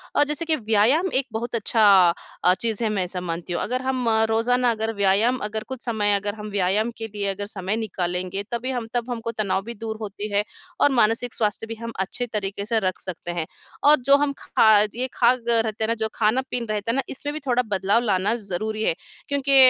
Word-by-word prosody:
अ, 290 - +5
जैसे 300 +2 -2
कि 320 -1 +2
व्यायाम 235 - +2
एक 265 0 +1
बहुत 235 +2 -3
अच्छा 225 0 +1 0.6
अ, 180 - +6
चीज़ 230 +2 -2
है 220 - +1
मैं 200 -3 0
ऐसा 180 0 -5
मानती 175 0 -4
हूँ। - - -1
अगर 255 +3 -1
हम 260 -2 -1 0.2
रोज़ाना 245 +2 +2
अगर 220 0 -2
व्यायाम 200 +5 +3
अगर 215 +1 -3
कुछ 260 -2 -6
समय 210 -3 +1
अगर 205 +1 -2
हम 210 -1 -7
व्यायाम 200 +4 +1
के 225 - -4
लिए 200 -1 -1
अगर 200 +1 -5
समय 195 0 -3
निकालेंगे 185 -2 -2
तभी 240 +2 -2
हम 245 -3 -3
तब 240 0 -1
हमको 230 -1 -3
तनाव 205 -4 -1
भी 235 - -5
दूर 220 -1 -4
होती 210 0 -5
है 205 +1 +3 0.4
और 290 - +5
मानसिक 230 +2 +2
स्वास्थ्य 215 0 -1
भी 225 - -5
हम 230 0 -4
अच्छे 195 +6 -2
तरीके 200 -1 -3
से 225 +1 +1
रख 185 -3 -1
सकते 175 -1 -6
हैं। 170 -2 -2 0.4
और 300 +1 +6
जो 275 +1 +7
हम 285 -1 0
खा 220 - +3 0.3
ये 255 +2 -1
खा 235 - +3
ग 235 -2 -7
रहते 225 -1 +1
हैं - - +1
ना 230 - +2
जो 220 -1 -1
खाना-पीन 245 +2 0
रहता 215 +1 -1
है - - -2
ना 270 - +2
इसमें 290 +2 -5
भी 305 - -4
थोड़ा 250 -2 +2
बदलाव 200 +3 +2
लाना 200 -1 +1
ज़रूरी 215 +1 -3
है। - - +2 0.4
क्योंकि 280 -1 +2
220 Hz, 220 wpm, -24 LUFS, 200-245 Hz, 0.6 s, जो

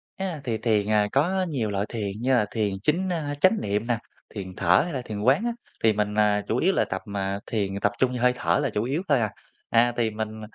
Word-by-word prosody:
À, 185 -6 -4
thì 115 -4 -1
thiền, 110 -2 +1
ờ, 105 -1 +3
có 185 +7 +2
nhiều 120 -8 -1
loại 100 +1 -1
thiền, 105 -4 -3
như 130 +1 +2
là 105 -3 +3
thiền 105 -3 0
chính, 185 +5 +1
a, 150 -4 -2
chánh 190 +6 +4
niệm 105 +3 -1
nè, 120 -2 +1 0.4
thiền 95 -2 -6
thở 90 0 +4
hay 170 -2 -5
là 130 - -2
thiền 105 -2 -5
quán 135 - +3
á, 240 - +1 0.3
thì 110 -1 +5
mình, 105 0 -1
à, 105 -1 +3
chủ 115 - 0
yếu 190 +7 +3
là - - +2
tập, 95 - -4
à, 100 0 -2
thiền, 100 -3 -2
à, - - -3
tập 100 - +2
trung 130 -1 +2
vô 125 - -3
hơi 125 0 +4
thở - - +1
là 140 - +1
chủ 105 0 -1
yếu 140 +7 -1
thôi 140 -4 +4
à. 110 - 0 0.4
À, 120 +1 +4
thì 115 -2 +2
mình 110 0 -5
115 Hz, 260 wpm, -25 LUFS, 105-140 Hz, 0.4 s, thì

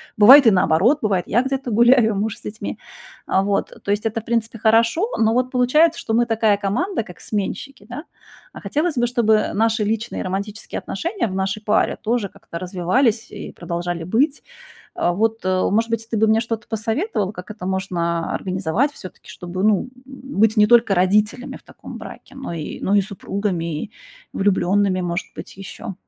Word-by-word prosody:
Бывает 250 +5 +9
и 225 - +8
наоборот, 190 - +3
бывает 195 -5 0
я 240 - +2
где-то 270 -1 -3
гуляю, 235 0 +4
а - - -4
муж 215 +3 -2
с - - -18
детьми. 215 +1 -6 0.5
А, 190 - +1
вот, 200 0 -1
э, - - -16
то 200 - -2
есть 210 +2 -1
это, 225 0 -1
в - - -28
принципе, 230 -1 -1
хорошо, 230 - +3
но 225 0 +2
вот 250 +1 0
получается, 300 +7 +3
что 220 - -3
мы 240 +1 +3
такая 220 -2 +2
команда, 220 - -1
как 180 -4 -13
сменщики, 215 +4 -5
да. 285 +8 -7 0.5
А - - -10
хотелось 305 +1 -1
бы, 240 0 +2
чтобы 225 -3 +2
наши 225 +1 +1
личные 225 +2 -2
и - - -3
романтические 200 +4 -4
отношения 340 - -3
в 190 - -5
нашей 195 +2 -2
паре 210 0 +1
тоже 230 -3 -1
как-то 170 - -10
развивались 210 +6 0
и - - -7
продолжали 170 0 -4
быть. 260 - 0 0.5
Э, 175 - 0
вот, 225 +4 0
э, 185 0 +1
может 225 +3 +1
быть, 225 0 -2
ты 230 - -2
бы 220 +1 +3
мне 220 +1 +3
что-то 230 -1 -4
посоветовал, 220 - -2
как 180 +2 -10
это 210 -3 -7
можно 175 -3 -2
организовать 190 - -1
всё-таки, 185 - -12
чтобы 180 +2 -6
быть, - - +1
ну, 200 - +2 0.3
м, 265 -5 -7
быть 220 0 +4
не 210 - +6
только 230 -2 +4
родителями 210 +7 +1
в - - -15
таком - - -11
браке, 270 - -11
но 270 -8 -6
и 155 -2 -6
но 195 - 0
и 205 - +4
супругами, 190 -5 -3
и 215 - -12 0.4
влюблёнными, 195 -1 +1
может 175 +1 -3
быть, - - -9
ещё. 195 0 -8
215 Hz, 195 wpm, -21 LUFS, 190-235 Hz, 0.5 s, Бывает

